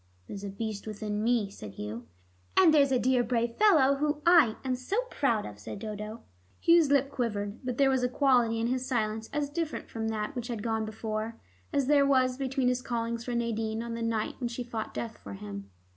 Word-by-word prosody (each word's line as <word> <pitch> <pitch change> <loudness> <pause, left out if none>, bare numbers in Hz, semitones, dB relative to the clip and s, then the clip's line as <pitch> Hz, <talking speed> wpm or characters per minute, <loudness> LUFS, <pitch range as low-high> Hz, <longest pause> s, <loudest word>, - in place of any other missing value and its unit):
"There's 200 - -7
a 200 - -4
beast 215 +1 -5
within 210 0 -3
me," 225 -4 +1
said 105 - -9
Hugh. 110 +4 -6 0.5
"And 355 -4 +7
there's 280 -3 +5
a 260 - +4
dear 250 0 +2
brave 235 -1 -1
fellow 300 -10 +5
whom 295 +1 0
I 325 -11 +6
am 260 - +1
so 255 - -2
proud 235 -7 +1
of," 105 0 -9
said 105 +1 -7
Dodo. 215 +1 -6 0.4
Hugh's 335 -3 +5
lip 280 -1 +3
quivered, 210 -4 -2
but 250 -1 -3
there 275 -1 +4
was 260 -1 +2
a 250 - +1
quality 245 -4 +3
in 225 - 0
his 255 +1 0
silence 220 -3 -1
as 295 -1 -1
different 320 +1 -4
from 225 -1 -3
that 220 +5 -3
which 240 -1 -4
had 230 -4 -4
gone 220 -1 0
before, 220 +1 -4 0.4
as 280 - +1
there 285 +1 +5
was 255 -2 +3
between 265 -1 0
his 250 0 +1
callings 235 -2 -2
for 245 - -2
Nadine 225 -1 -1
on 235 0 -5
the 230 - -4
night 230 -2 -1
when 245 - -1
she 240 +1 -4
fought 230 -2 -5
death 230 -1 -5
for 100 - -9
him. 100 0 -8
235 Hz, 215 wpm, -29 LUFS, 215-265 Hz, 0.5 s, And